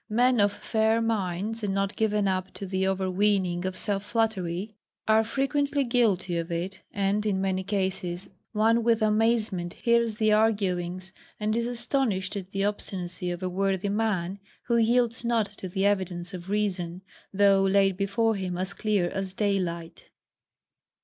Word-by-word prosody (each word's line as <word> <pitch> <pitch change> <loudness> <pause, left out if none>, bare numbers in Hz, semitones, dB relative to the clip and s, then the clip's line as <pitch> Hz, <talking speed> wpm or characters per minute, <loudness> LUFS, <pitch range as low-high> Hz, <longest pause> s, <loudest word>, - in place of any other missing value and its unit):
Men 245 +2 +3
of 205 0 +4
fair 220 +1 +1
minds, 215 -1 -1
and 200 -2 -1
not 195 0 -1
given 210 -2 +1
up 185 0 -1
to 200 - -6
the 190 0 0
overweening 190 -1 +1
of 185 - -5
self 200 -2 -1
flattery, 210 -3 -1 0.3
are 220 0 +5
frequently 280 +4 0
guilty 210 -8 +1
of 165 +1 -5
it; 175 +3 -3
and 200 +1 0
in 205 -3 0
many 190 -1 0
cases 190 -2 -2 0.2
one 225 +2 +3
with 225 -1 +3
amazement 215 -5 +1
hears 235 -2 +2
the 215 -1 +2
arguings, 185 -4 0 0.3
and 215 +1 0
is 235 0 0
astonished 240 -6 -1
at 190 -2 -5
the 195 0 -2
obstinacy 180 -3 -3
of 175 +1 -4
a - - 0
worthy 195 +1 0
man, 200 -3 -1 0.3
who 235 -1 +2
yields 235 0 +2
not 235 -2 +2
to 190 -2 -8
the 190 +2 0
evidence 185 -2 0
of 180 0 -7
reason, 190 -4 -1 0.3
though 195 0 +4
laid 195 0 +3
before 215 +4 +1
him 185 -3 -3
as 190 +2 -2
clear 200 -3 +1
as 190 +1 -4
daylight. 180 -5 -2
200 Hz, 155 wpm, -27 LUFS, 185-220 Hz, 0.3 s, are